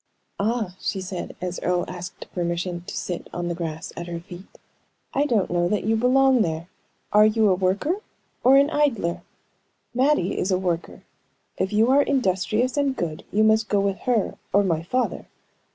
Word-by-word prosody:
"Ah," 215 -3 -1
she 195 - -2
said, 185 -1 -6
as 180 0 -3
Earle 180 0 +1
asked 180 0 -7
permission 175 0 -2
to - - -5
sit 175 -2 -4
on 175 0 -3
the - - -1
grass 165 +1 -5
at 170 - -6
her 170 -1 -4
feet, 175 +1 -11 0.7
"I 285 +2 +2
don't 215 -10 +1
know 175 0 +1
that 210 0 0
you 220 +3 +2
belong 255 +2 +4
there. 165 -3 -2 0.5
Are 210 +1 +7
you 215 -1 +3
a - - +5
worker 190 - 0 0.5
or 265 +2 +7
an 280 +2 +4
idler? 260 - +1 0.7
Mattie 255 -7 +2
is 185 - 0
a 185 - +3
worker; 175 -2 -3 0.5
if 190 - -1
you 220 +4 +3
are 280 +2 +6
industrious 245 -1 +1
and 280 -2 +1
good, 160 -7 -4
you 215 +2 +3
must 220 0 +3
go 205 - +2
with 195 -1 0
her 235 -5 0
or 200 +1 +4
my 165 -4 0
father. 250 +9 -2
195 Hz, 180 wpm, -24 LUFS, 175-240 Hz, 0.7 s, Are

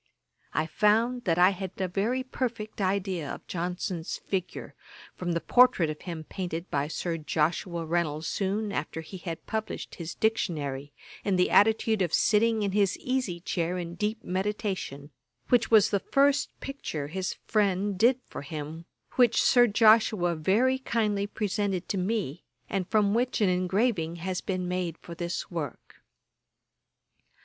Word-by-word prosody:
I 155 - +2
found 225 +8 +2
that 170 -3 +2
I 180 +2 +6
had 190 -1 -5
a 190 - 0
very 215 +8 0
perfect 230 -5 -4
idea 185 -5 -1
of - - -8
Johnson's 175 -1 -3
figure, 185 -2 -4 0.4
from 175 -1 -3
the 170 - +1
portrait 245 -8 +4
of 150 - -9
him 165 -3 -6
painted 175 0 -5
by 140 0 0
Sir 165 +2 -3
Joshua 165 +3 -1
Reynolds 160 -2 -1
soon 205 +3 -1
after 165 - -3
he 175 +4 -9
had 170 -2 -6
published 220 -1 -4
his 160 0 -5
Dictionary, 145 -11 -1 0.3
in 200 -2 +1
the 180 0 +2
attitude 220 0 +4
of 175 -3 +2
sitting 220 0 +3
in 200 - 0
his 200 -1 +2
easy 255 -10 -2
chair 175 0 -1
in 170 -1 -5
deep 210 +5 -2
meditation, 185 -7 -3 0.4
which 245 -2 +3
was 220 -3 +6
the 200 - +2
first 280 +5 +2
picture 265 - -5
his 190 +3 -3
friend 200 -1 +1
did 245 +3 +5
for - - -7
him, 155 +2 -6 0.3
which 240 -3 +5
Sir 245 -2 +5
Joshua 215 -4 +4
very 220 +11 +2
kindly 210 -5 0
presented 205 -3 -2
to 195 - 0
me, 185 -5 -2 0.2
and 190 -3 -2
from 210 -2 +3
which 245 +3 +1
an 205 -3 +3
engraving 180 -1 +1
has 180 +2 -3
been 185 -2 -2
made 180 -2 -2
for 170 - -10
this 170 +2 -4
work. 155 -7 -6
190 Hz, 155 wpm, -28 LUFS, 170-215 Hz, 0.4 s, I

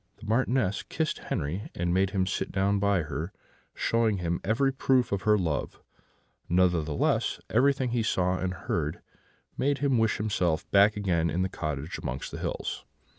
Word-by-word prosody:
The 110 - -12
Marchioness 115 -2 +1
kissed 155 0 -2
Henri, 85 +9 -2
and 85 0 0
made 95 +1 +3
him 95 -2 0
sit 95 - -2
down 100 +1 +1
by 100 -3 +2
her, 80 +4 -4 0.4
showing 115 -3 +1
him 85 -1 -2
every 130 +6 +2
proof 130 -2 +2
of 100 -1 0
her 105 - +6
love; 80 -7 -2 0.7
nevertheless, 85 -4 +1
everything 130 +1 +3
he 120 -1 +1
saw 90 -4 +1
and 95 0 -1
heard 80 -3 -3 0.6
made 140 +1 +2
him 135 -4 +2
wish 110 -1 +2
himself 90 -6 0
back 100 +1 +5
again 85 -5 +1
in 90 +3 0
the 95 - -1
cottage 75 -3 -4
amongst 65 +2 -4
the - - -6
hills. - - -3
95 Hz, 165 wpm, -28 LUFS, 85-110 Hz, 0.7 s, her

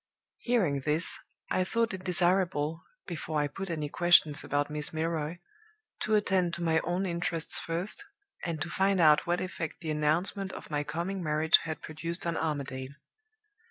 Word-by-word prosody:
"Hearing 195 - +1
this, 150 +5 +2 0.3
I 185 - +2
thought 230 +3 0
it 185 -1 -6
desirable, 175 -3 +1 0.2
before 155 -2 -3
I 145 - +1
put 195 +6 -6
any 155 -3 -2
questions 160 -2 +5
about 145 +1 -1
Miss 150 0 +1
Milroy, 160 0 -2 0.6
to 215 - +1
attend 190 -4 +1
to 170 - -5
my 160 -1 +3
own 175 +4 -1
interests 170 -2 0
first, 175 - -1 0.4
and 165 -3 -3
to - - -6
find 195 -1 +2
out 155 -2 +5
what 175 +1 +1
effect 170 -3 -5
the 160 -2 -3
announcement 170 +6 0
of - - -9
my 145 -1 0
coming 175 +5 -3
marriage 155 0 +4
had 155 -1 -5
produced 165 +3 -3
on 170 -1 -1
Armadale. 140 -4 -3
165 Hz, 160 wpm, -29 LUFS, 150-185 Hz, 0.6 s, questions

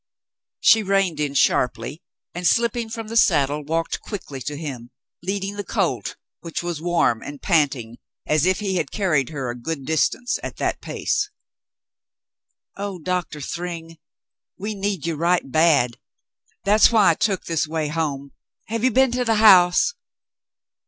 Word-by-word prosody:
She 225 - +6
reined 195 -5 +1
in 145 -2 -2
sharply 125 +2 +1 0.3
and, 175 0 -1
slipping 235 0 +1
from 225 -1 -6
the 225 - -6
saddle, 150 -9 +3
walked 165 +3 -2
quickly 145 - -7
to 145 +3 -4
him, 130 -6 -7 0.3
leading 195 +2 -3
the 205 - -3
colt, - - -1 0.2
which 165 0 -5
was 170 -3 -4
warm 170 -9 +1
and 145 -1 -8
panting 135 - 0 0.3
as 155 +2 +2
if 185 +2 +1
he 190 -3 -1
had 160 -5 -1
carried 155 - 0
her 135 -5 -4
a - - -7
good 135 +3 -5
distance 245 - 0
at - - -6
that - - -2
pace. 410 0 -1 1.5
"Oh, 200 -1 -5
Doctor 175 -3 -3
Thryng, 165 +1 -6 0.6
we 210 +3 -4
need 200 -4 -3
you 165 - -1
right 170 +1 +1
bad. 150 -7 +3 0.6
That's 210 +3 +5
why 215 -6 +5
I - - +2
took 195 +2 -1
this 165 -2 0
way 155 -1 -2
home. 145 -3 -3 0.4
Have 225 0 -2
you 255 - +5
been 265 +1 +3
to 250 0 0
the 225 -2 +2
house 195 - +6
170 Hz, 155 wpm, -22 LUFS, 150-205 Hz, 1.5 s, She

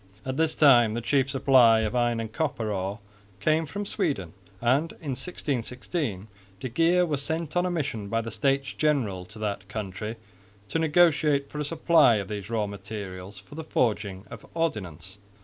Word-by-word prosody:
At 130 0 -2
this 160 +1 +1
time 120 -7 +6
the - - -1
chief 135 +3 +1
supply 130 -4 +5
of 110 +2 -2
iron 120 -1 +1
and 110 -1 -5
copper 125 -6 -1
ore 95 +1 -2 0.4
came 155 +7 +1
from 205 +7 -4
Sweden; 145 - -2 0.3
and 135 +8 +1
in 150 -4 -6
1616 125 - -3 0.3
de 130 - -4
Geer 170 +7 +3
was 145 -4 -1
sent 160 +2 -3
on 175 +1 +2
a - - -1
mission 140 - -2
by 115 +1 0
the 115 0 -6
States 135 +3 0
General 120 -12 0
to 100 - -13
that 100 -2 -3
country 105 +1 -5 0.5
to 165 - 0
negotiate 155 -3 +3
for 150 - -5
a - - 0
supply 160 -4 +4
of 100 -2 -3
these 105 -1 -5
raw 110 -2 0
materials 100 -1 -7
for 95 +8 -14
the 160 +2 -6
forging 105 -9 -1
of 115 - -9
ordnance. 95 - -3
120 Hz, 175 wpm, -27 LUFS, 105-150 Hz, 0.5 s, time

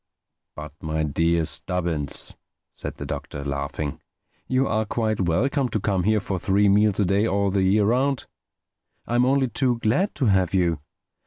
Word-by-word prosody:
"But 75 -1 -8
my 80 0 -1
dear 80 +3 +1
Stubbins," 85 -5 -1 0.4
said - - -6
the - - -7
Doctor, 70 -1 -6
laughing, 70 +1 -4 0.5
"you 130 +1 +1
are 110 0 +1
quite 110 -1 -1
welcome 125 - +1
to 110 - -1
come 95 -3 0
here 110 0 +3
for 95 -2 -3
three 100 +3 +2
meals 105 0 +3
a 100 - +3
day 100 +4 +2
all 100 0 +1
the 95 0 +1
year 100 +2 +3
round. 130 +4 +1 0.8
I'm 120 +1 +2
only 135 0 +3
too 120 +1 +1
glad 120 - 0
to 135 - 0
have 95 -3 +2
you. 85 -4 +1
100 Hz, 165 wpm, -24 LUFS, 85-115 Hz, 0.8 s, here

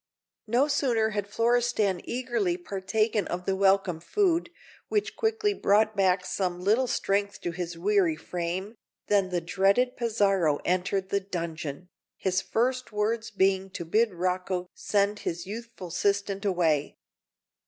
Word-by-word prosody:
No 245 +6 +3
sooner 245 -7 +1
had 205 -1 -2
Florestan 230 -4 +1
eagerly 235 -8 -1
partaken 200 +3 -1
of 180 +1 -4
the 195 - +1
welcome 190 -3 +2
food, 350 - +1 0.4
which 420 -2 -1
quickly 440 -2 +1
brought 215 - +2
back 185 -2 +2
some 180 -2 -2
little 220 +8 +2
strength 200 -2 0
to 175 - -2
his 175 -1 -5
weary 185 -2 +2
frame, 180 +5 -4 0.4
than 200 -2 +3
the 180 -1 -1
dreaded 195 +9 +2
Pizarro 195 -10 +2
entered 185 +1 0
the 200 - +1
dungeon, 170 -4 -5 0.3
his 190 0 0
first 255 +2 -1
words 220 +2 -1
being 190 -1 +1
to 170 - -6
bid 220 +6 +2
Rocco 180 0 -1
send 205 0 0
his 170 +1 -4
youthful 225 -2 -7
assistant 200 +3 0
away. 165 -7 +1
195 Hz, 135 wpm, -27 LUFS, 180-220 Hz, 0.4 s, No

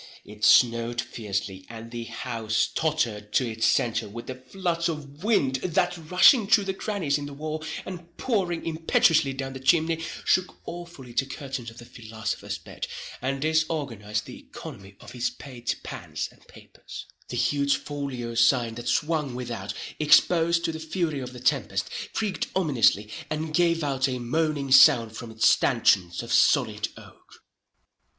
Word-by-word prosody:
It 105 +1 -12
snowed 115 +2 +4
fiercely, 100 -4 -4
and 115 0 -9
the 120 -1 -5
house 115 -2 -1
tottered 120 -10 -1
to 130 - +2
its 115 0 0
centre 115 -2 +1
with 115 +3 -8
the 130 - -5
floods 170 +6 -2
of 150 0 -7
wind 140 - +2
that, 175 +5 0
rushing 180 - +5
through 210 0 +5
the 190 -1 -2
crannies 190 -8 -1
in 145 - -5
the 140 - -9
wall, 155 +1 -4 0.2
and 175 -2 -9
pouring 190 -9 -1
impetuously 160 -2 +3
down 135 0 -5
the 130 - -7
chimney, 165 +3 +2 0.2
shook 185 -1 +1
awfully 170 -7 -9
the 135 +3 0
curtains 135 -3 -6
of 115 - -15
the 120 - -11
philosopher's 110 -2 -5
bed, - - -7 0.3
and 135 +2 -2
disorganized 145 - -1
the - - -10
economy 100 0 -11
of - - -12
his 125 0 -1
pate 125 -4 -5
pans - - -5
and - - -24
papers. - - -11 0.2
The - - -5
huge 140 -1 +2
folio 135 -5 -5
sign 115 0 +3
that 120 - -3
swung 150 -5 0
without, 115 -5 -5 0.2
exposed 165 +2 +4
to - - 0
the 160 - -6
fury 160 -2 -2
of 125 -1 -6
the 125 - -10
tempest, 125 -8 0 0.2
creaked 210 -4 -1
ominously, 120 - +2 0.2
and 155 0 -3
gave 170 -1 +2
out 135 -2 +1
a 130 - -2
moaning 140 +2 -1
sound 115 -4 +7
from 120 0 -7
its 110 0 +2
stanchions 85 -3 +3
of - - -4
solid - - +3
oak. - - -16
135 Hz, 160 wpm, -26 LUFS, 115-160 Hz, 0.3 s, sound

